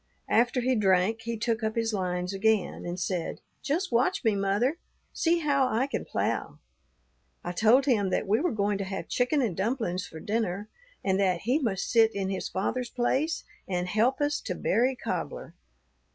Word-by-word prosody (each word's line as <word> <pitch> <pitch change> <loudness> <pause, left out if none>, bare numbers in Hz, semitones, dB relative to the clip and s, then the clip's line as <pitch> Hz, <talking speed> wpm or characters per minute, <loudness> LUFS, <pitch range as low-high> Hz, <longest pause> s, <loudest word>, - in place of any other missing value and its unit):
After 245 +3 +3
he 255 +2 +2
drank, 205 0 +2
he 235 -1 -2
took 230 +1 -1
up 220 0 -1
his 230 -1 0
lines 180 -1 -2
again, 205 -2 +1
and 175 +1 -4
said, 180 -2 -2 0.2
'Just 330 +5 -1
watch 250 +10 +2
me, 220 -3 +3
mother; 205 - +1 0.3
see 335 0 +2
how 280 -3 +2
I 255 +1 +1
can 275 - -4
plough.' - - -2 0.9
I 175 - -3
told 225 +8 +4
him 215 -8 +2
that 185 - -1
we 215 +3 +3
were 355 - +1
going 205 -2 0
to - - -1
have 190 0 -5
chicken 255 +3 +1
and 210 -8 -1
dumplings 200 -3 -1
for 160 - -10
dinner, 210 0 -2 0.4
and 190 0 +2
that 185 -3 +2
he 250 +7 +1
must 215 -9 -1
sit 225 -2 +4
in 195 -1 -1
his 190 - -3
father's 240 +6 -2
place 265 +7 0 0.2
and 180 -1 -1
help 225 +9 +1
us 290 +1 +1
to - - -4
berry 255 +3 +1
cobbler. - - -4
220 Hz, 180 wpm, -28 LUFS, 195-255 Hz, 0.9 s, told